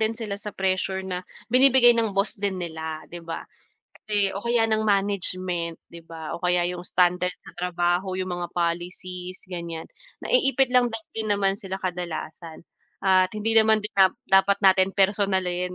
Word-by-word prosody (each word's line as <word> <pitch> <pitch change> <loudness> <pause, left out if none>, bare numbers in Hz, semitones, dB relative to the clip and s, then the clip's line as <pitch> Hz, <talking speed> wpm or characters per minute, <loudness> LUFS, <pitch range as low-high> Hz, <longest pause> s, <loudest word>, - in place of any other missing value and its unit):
din 220 0 +2
sila 220 -3 -5
sa 210 - -6
pressure 190 0 -1
na 180 -1 -3 0.3
binibigay 255 -1 +6
ng 225 -3 0
boss 195 +2 +1
din 200 -2 -1
nila, 160 -2 -5
'di 175 - -8
ba, 165 0 -5 0.6
kasi 205 -2 0
o - - -3
kaya 235 -1 +2
ng 220 0 +1
management 185 -4 -1 0.2
'di 170 - -10
ba 160 -2 -7
o - - -12
kaya 180 0 +2
'yung 180 0 -5
standard 180 0 +2
sa - - -13
trabaho 175 +1 0
'yung 185 -1 -3
mga 175 0 -3
policies 180 +1 -3
gan'yan 170 -3 -5 0.4
naiipit 275 - +3
lang 250 -1 +4 0.3
din 220 -1 -2
naman 200 -1 +2
sila 190 -3 -5
kadalasan, 170 -2 -5 0.4
at 185 -1 +5
hindi 215 +2 -1
naman 220 0 +5 0.5
dapat 195 +1 +5
natin 190 0 +5
personalin, 190 -2 +1
185 Hz, 155 wpm, -25 LUFS, 175-205 Hz, 0.6 s, binibigay